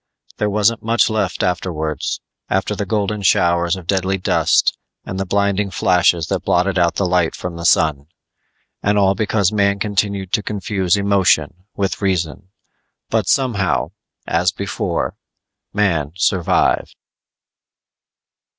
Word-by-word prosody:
_ - - -54
_There 105 - +1
wasn't 105 +2 +1
much 115 0 +2
left 110 0 -1
afterwards 80 -4 -2 0.3
after 95 +2 0
the 100 -1 -4
golden 105 -1 -1
showers 85 -2 +2
of 90 -2 -9
deadly 95 +1 0
dust 90 - +2 0.3
and 95 - -5
the 95 - -2
blinding 100 +1 +1
flashes 90 -3 +2
that - - 0
blotted 90 +1 +1
out 85 -1 +2
the 100 - 0
light 90 -2 +1
from 90 -1 -6
the 85 0 -6
sun._ 75 -4 +2 0.7
And 105 +1 +1
all 95 -1 +4
because 105 -1 +1
man 100 -1 +2
continued 100 -2 -1
to - - +2
confuse 100 -2 -1
emotion 95 -4 +1
with 100 0 -2
reason. 95 -1 -2 0.6
_But - - +1
somehow, 120 -8 +1 0.3
as - - +1
before, - - -3 0.5
man 85 -8 0
survived.... 90 -1 +1
95 Hz, 130 wpm, -19 LUFS, 90-100 Hz, 0.7 s, all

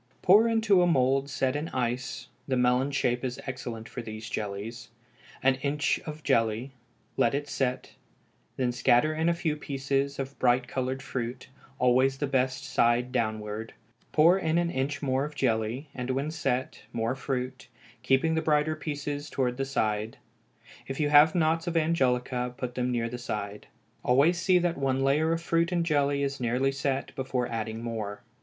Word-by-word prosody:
Pour 210 +5 +7
into 220 -5 +4
a 175 - +4
mould 135 -2 +2
set 135 0 0
in 150 +3 -3
ice 125 0 -3 0.2
(the 130 -2 +1
melon 125 +2 +3
shape 125 -3 0
is 125 -1 -3
excellent 120 -4 -6
for - - -6
these 110 0 -7
jellies) 110 +3 -5 0.5
an 135 0 +3
inch 145 -1 0
of 155 0 -7
jelly, 115 -1 +1 0.5
let 120 - +3
it 145 +1 -2
set; 130 -2 -2 0.7
then 125 -2 +1
scatter 125 +5 +3
in 160 +2 +1
a - - +3
few 165 -3 -1
pieces 140 -1 -2
of 135 0 -5
bright 125 0 +3
colored 130 +1 -3
fruit, 125 0 -5 0.3
always 130 +2 +3
the 145 - -1
best 130 -1 0
side 125 -2 +2
downward; 110 -2 -3 0.4
pour 170 +5 +5
in 160 -2 +1
an 170 0 +1
inch 140 +2 -2
more 135 0 +1
of 150 0 -6
jelly, 115 +2 0
and 125 0 -5
when 135 +4 -1
set 135 -5 -2
more 115 +1 -1
fruit, 130 -2 -4 0.3
keeping 135 +6 +2
the 160 - +1
brighter 155 0 +2
pieces 145 -1 -4
towards 125 -3 -1
the 135 - 0
side; 110 -4 -1 0.7
if 135 - -5
you 150 -1 +2
have 150 +2 +7
knots 165 0 +1
of 170 -1 0
angelica, 125 -6 +1
put 125 -1 -4
them 125 0 -1
near 115 -1 0
the 120 +1 -6
side. 105 -3 -5 0.4
Always 145 +8 +4
see 185 0 +4
that 175 -3 0
one 135 -1 +1
layer 150 +4 +2
of 165 0 -1
fruit 170 +1 +1
and 170 -2 +1
jelly 145 -3 +1
is 140 0 -2
nearly 125 +3 +1
set 140 -1 -2
before 130 -2 -2
adding 115 0 -4
more. 105 -3 -4
135 Hz, 175 wpm, -28 LUFS, 125-150 Hz, 0.7 s, Pour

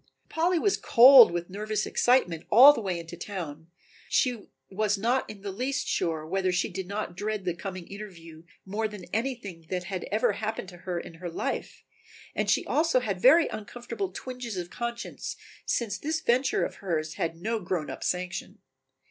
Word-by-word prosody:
Polly 345 +2 +1
was 390 +4 +2
cold 250 0 +9
with 175 +1 -4
nervous 215 +1 -2
excitement 180 -10 +2
all 265 +6 +9
the 260 - -4
way 185 -4 -2
into 170 +1 -8
town. 165 -4 -6 0.4
She 245 -5 +1 0.2
was 210 +1 0
not 240 +6 0
in 210 -2 -9
the 200 0 -4
least 255 +7 -2
sure 160 -2 -1
whether 185 +2 0
she 180 - 0
did 190 0 -5
not 200 -3 -4
dread 210 0 -3
the 175 - 0
coming 185 0 -7
interview 170 -6 -10 0.2
more 210 +3 -1
than 210 -3 -9
anything 220 -9 -3
that 180 -1 -2
had 185 0 -4
ever 215 +2 +1
happened 215 -3 -4
to 175 - -12
her 175 -1 -1
in 170 - -9
her 175 +2 -7
life 165 - -4 0.5
and - - -1
she - - +2
also 315 -3 +2
had 200 -6 -3
very 315 +5 +7
uncomfortable 215 -1 -5
twinges 245 0 -6
of 175 -1 -5
conscience, 235 0 -5 0.3
since 220 -4 -1
this 315 +2 -1
venture 260 -2 +2
of - - -7
hers 160 -5 -2
had 165 0 -1
no 225 +4 -1
grown 175 -5 -3
up - - -7
sanction. 180 +1 -3
200 Hz, 180 wpm, -28 LUFS, 175-235 Hz, 0.5 s, cold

